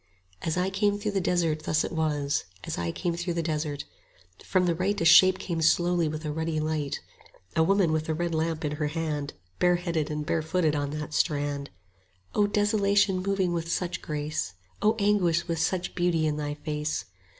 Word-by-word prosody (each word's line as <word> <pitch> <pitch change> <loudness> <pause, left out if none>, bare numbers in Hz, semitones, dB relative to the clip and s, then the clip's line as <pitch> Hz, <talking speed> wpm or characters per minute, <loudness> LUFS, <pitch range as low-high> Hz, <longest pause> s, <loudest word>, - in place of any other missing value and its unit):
60 - - -4
As 160 - 0
I 180 +1 +1
came 205 +1 +1
through 205 +1 -2
the 195 -1 0
desert 170 -3 +1
thus 155 0 +1
it - - -4
was, 150 -3 0 0.2
As - - -3
I 85 -1 -2
came 170 - -2
through 175 0 -2
the 170 - 0
desert: 150 -2 -2 0.6
From 185 -1 +2
the 175 - +2
right 190 +5 0
A 165 - 0
shape 185 +3 +8
came 170 -3 -3
slowly 175 +1 +3
with 155 +1 -4
a 150 - -1
ruddy 160 0 -1
light; 155 -2 -2 0.5
A - - +4
woman 190 0 +3
with 155 0 -1
a 160 - +1
red 170 +1 -1
lamp 160 0 -1
in 150 0 -2
her 150 -1 0
hand, 150 -2 -3 0.3
Bareheaded 175 -3 +1
and 150 0 -3
barefooted 160 0 +1
on 145 -1 -1
that 150 +1 -5
strand; 145 -3 0 0.6
65 210 - +2
O - - +3
desolation 205 -2 +2
moving 190 -2 0
with 165 0 -2
such 180 0 -2
grace! 150 -9 -3 0.3
O 215 +1 +3
anguish 195 -5 +2
with 165 -2 -1
such 175 +2 -1
beauty 175 -3 +1
in 150 -1 +1
thy 145 -1 -3
face! 150 0 -3
165 Hz, 195 wpm, -27 LUFS, 150-180 Hz, 0.6 s, shape